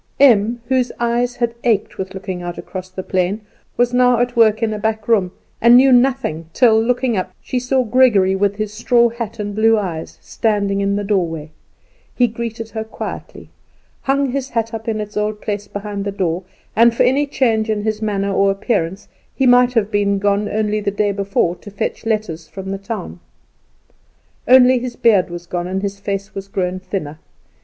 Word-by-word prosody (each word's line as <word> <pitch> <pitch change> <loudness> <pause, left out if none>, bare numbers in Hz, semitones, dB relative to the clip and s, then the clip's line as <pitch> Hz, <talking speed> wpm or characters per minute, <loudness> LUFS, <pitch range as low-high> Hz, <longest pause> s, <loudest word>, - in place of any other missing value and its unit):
Em, 235 -3 +4
whose 255 -1 +1
eyes 240 +1 0
had 235 -1 -1
ached 225 -5 0
with 190 +1 -5
looking 190 -2 -5
out 175 0 -6
across 185 -1 -7
the 185 0 -6
plain, 185 +4 -1 0.4
was 245 0 +2
now 250 -1 +4
at 245 +1 0
work 220 -1 +4
in 220 -1 0
a 210 - -4
back 220 0 -2
room, 200 -6 +2 0.3
and 235 +1 +7
knew 265 +1 +6
nothing 245 -11 +2
till, 220 -3 +4
looking 245 +1 0
up, 185 - -2
she 255 - -3
saw 255 +1 +1
Gregory, 215 -6 +3
with 200 +1 +1
his 215 0 -4
straw 235 +2 +3
hat 230 -1 -6
and 205 -1 -4
blue 225 +2 +3
eyes, 175 -6 -4
standing 200 -3 -1
in 200 0 0
the 205 - -2
doorway. 165 -7 -1 0.6
He 250 - +4
greeted 230 -1 -5
her 220 -1 -3
quietly, 220 - -8 0.5
hung 275 -1 0
his 270 0 -3
hat 230 -1 -2
up 225 0 -6
in 220 -1 -1
its 210 0 -6
old 210 0 -1
place 205 -1 -4
behind 205 0 -5
the 200 - -3
door, 180 -2 -2 0.3
and 230 +1 +5
for - - +3
any 280 +3 +2
change 225 -6 +1
in 210 -1 -1
his 215 0 -2
manner 200 -2 -1
or 195 +1 +3
appearance 195 -2 -1 0.3
he 265 - +1
might 245 0 +5
have 220 -3 +1
been 200 -1 +1
gone 205 +1 0
only 215 0 0
the 205 -1 -1
day 205 0 0
before 195 -3 0
to - - -12
fetch 205 +3 -4
letters 190 -8 -2
from 190 +3 -7
the 195 - -4
town. 195 - -6 1.3
Only 255 0 +6
his 245 0 -5
beard 205 -7 +3
was 175 0 -7
gone, 175 0 -3
and 190 +2 -3
his 200 0 -3
face 200 +1 -4
was 195 0 -6
grown 185 -1 -2
thinner. 155 -6 -5
210 Hz, 195 wpm, -18 LUFS, 195-235 Hz, 1.3 s, and